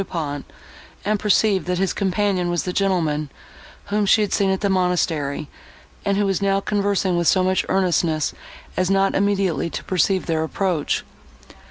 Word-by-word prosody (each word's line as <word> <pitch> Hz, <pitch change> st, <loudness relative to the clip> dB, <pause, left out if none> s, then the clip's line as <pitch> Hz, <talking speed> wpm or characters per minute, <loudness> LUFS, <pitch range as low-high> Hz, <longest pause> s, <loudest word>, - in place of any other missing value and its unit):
Du -, -, -3 dB
Pont, 145 Hz, -5 st, -4 dB, 0.6 s
and 210 Hz, 0 st, +1 dB
perceived, 205 Hz, -2 st, +2 dB
that 180 Hz, 0 st, 0 dB
his 190 Hz, +1 st, 0 dB
companion 190 Hz, -2 st, 0 dB
was 175 Hz, -1 st, 0 dB
the 180 Hz, -, -3 dB
gentleman, 160 Hz, -7 st, 0 dB, 0.6 s
whom 205 Hz, 0 st, +1 dB
she 215 Hz, -, +5 dB
had 205 Hz, -, -1 dB
seen 195 Hz, -1 st, +2 dB
at 190 Hz, 0 st, 0 dB
the 205 Hz, -, +1 dB
monastery, 170 Hz, -6 st, 0 dB, 0.6 s
and 200 Hz, 0 st, +1 dB
who 205 Hz, -, +2 dB
was 195 Hz, 0 st, 0 dB
now 195 Hz, 0 st, +2 dB
conversing 200 Hz, -2 st, 0 dB
with 170 Hz, -1 st, +1 dB
so 185 Hz, -, +4 dB
much 185 Hz, 0 st, +1 dB
earnestness 170 Hz, -4 st, +1 dB, 0.4 s
as 185 Hz, 0 st, 0 dB
not 195 Hz, 0 st, +2 dB
immediately 195 Hz, -4 st, +1 dB
to -, -, -6 dB
perceive 185 Hz, +1 st, +1 dB
their 160 Hz, -2 st, 0 dB
approach. 170 Hz, -2 st, -1 dB
190 Hz, 170 wpm, -22 LUFS, 175-200 Hz, 0.6 s, she